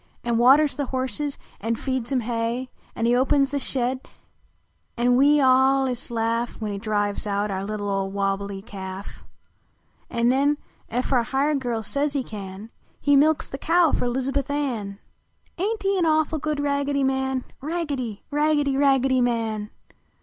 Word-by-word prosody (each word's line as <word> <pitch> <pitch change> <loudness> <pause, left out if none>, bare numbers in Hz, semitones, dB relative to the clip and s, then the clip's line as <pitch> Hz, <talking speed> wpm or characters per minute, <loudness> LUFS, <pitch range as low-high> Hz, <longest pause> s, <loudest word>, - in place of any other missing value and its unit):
An 235 -1 +1
waters 275 +4 +5
the 285 -2 -2
horses, 260 +2 -2 0.2
an 225 +2 -1
feeds 260 +1 -3
em 260 -2 +2
hay: 235 +2 -2 0.2
An 230 - -1
he 240 +1 +4
opens 275 +2 +3
the 285 - 0
shed 255 -1 -1 1.0
an 245 +1 +3
we 290 +3 +5
all 265 0 +4
ist 250 -1 -3
laugh 230 +1 -1
\Yhen 215 -2 -3
he 200 - -4
drives 205 -1 -1
out 205 0 -1
our 190 0 -2
little 205 0 -4
old 195 -1 -1
wohhlc 200 0 -1
ly 195 -1 -6
calf; 190 -1 -8 0.9
An 235 0 +1
nen 280 +3 +3 0.3
ef 250 +4 -1
our 250 - +4
hired 275 +5 0
girl 235 -4 -2
says 280 +5 -1
he 275 -3 0
can 205 0 -8 0.3
He 285 0 +3
milks 300 +2 +3
the 270 - -7
cow 335 0 +3
fer - - 0
Lizahuth 265 +3 -1
Ann. 240 -9 -2 0.6
Aint 425 +4 -1
he 390 0 +1
a - - +1
awful 315 -1 +2
good 300 0 -2
Raggedy 280 -1 0
Man? 265 -1 0 0.2
Raggedy! 285 -9 -3
Raggedy! 295 -2 +2
Raggedy 270 -2 +3
Man! 225 -3 -1
255 Hz, 165 wpm, -24 LUFS, 225-280 Hz, 1.0 s, waters